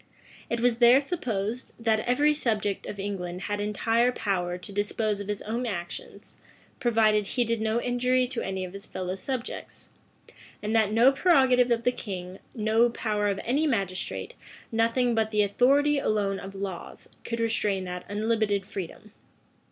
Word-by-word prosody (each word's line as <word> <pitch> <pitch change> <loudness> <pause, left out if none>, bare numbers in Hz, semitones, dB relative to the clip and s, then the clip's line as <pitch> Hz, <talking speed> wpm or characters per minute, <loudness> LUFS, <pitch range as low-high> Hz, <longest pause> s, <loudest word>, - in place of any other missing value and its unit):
It 235 -1 -1
was 240 -1 +2
there 245 +2 +7
supposed, 245 - -3
that 225 -2 +1
every 290 +7 +3
subject 215 -8 -1
of 205 - -6
England 185 -3 -4
had 205 0 -2
entire 225 +4 +2
power 180 -6 -1
to 180 +3 -9
dispose 205 +1 -1
of 200 - -6
his 210 -1 -3
own 235 +3 -2
actions, 175 -5 -6 0.4
provided 215 -4 +3
he 245 - +1
did 230 -1 -1
no 220 +1 +1
injury 250 +1 +1
to 255 -2 -3
any 190 -1 -3
of 180 - -10
his 200 +1 -8
fellow 185 0 -4
subjects; 255 +5 -6 0.7
and 215 +2 -1
that 215 -2 +3
no 235 +5 +6
prerogative 265 -5 +4
of 235 -1 +1
the 245 - +3
king, 185 -5 -6 0.2
no 220 +1 +3
power 210 -3 -1
of 200 -1 0
any 285 +7 +1
magistrate, 195 - -2 0.4
nothing 230 +2 +2
but 220 -1 +1
the 210 -1 +2
authority 280 +8 +3
alone 200 -5 0
of 195 0 -9
laws, 195 -3 -6 0.2
could 230 0 -4
restrain 210 -4 0
that 180 -1 -5
unlimited 210 -1 0
freedom. 200 +1 -7
220 Hz, 160 wpm, -27 LUFS, 200-240 Hz, 0.7 s, there